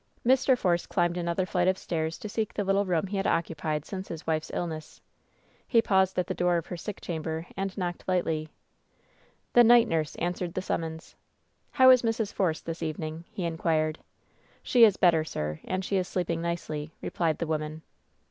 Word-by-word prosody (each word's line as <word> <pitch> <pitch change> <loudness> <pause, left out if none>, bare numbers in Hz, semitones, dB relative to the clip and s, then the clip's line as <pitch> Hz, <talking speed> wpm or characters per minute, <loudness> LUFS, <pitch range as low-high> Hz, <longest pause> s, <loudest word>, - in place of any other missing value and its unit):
Mr. 260 +1 +4
Force 175 -5 +1
climbed 175 -1 +1
another 175 +1 -1
flight 180 -1 0
of 190 0 +3
stairs 160 -2 -3
to - - -7
seek 215 0 -3
the 205 - 0
little 195 +1 +2
room 180 -1 +1
he 195 +1 -4
had 195 - 0
occupied 155 -2 -1
since 190 -1 -6
his 165 -2 -7
wife's 155 -1 -1
illness. 160 -3 -5 0.7
He 230 - +4
paused 190 -4 +2
at 180 - +2
the - - -3
door 175 0 +2
of 165 - -3
her - - -6
sick 195 +4 -6
chamber 160 -1 -4
and 195 -1 -3
knocked 175 -2 -4
lightly. 160 -4 0 1.0
The 240 - +8
night 240 0 +7
nurse 160 -2 -1
answered 175 0 -3
the 185 - -1
summons. 160 -2 -4 0.6
"How 260 -1 +8
is 255 -1 +6
Mrs. 225 -3 -1
Force 170 -5 0
this 165 +1 -6
evening 160 +1 -4
?" - - -35
he 190 - -5
inquired. 160 -1 0 0.6
"She 240 -2 +6
is 205 -3 +3
better, 165 -3 +4
sir, 75 - -4
and 185 0 -2
she 195 - 0
is 185 -1 0
sleeping 170 -2 -2
nicely," 160 -3 -4
replied 165 -3 0
the 170 - -2
woman. 155 0 -3
175 Hz, 190 wpm, -28 LUFS, 160-190 Hz, 1.0 s, The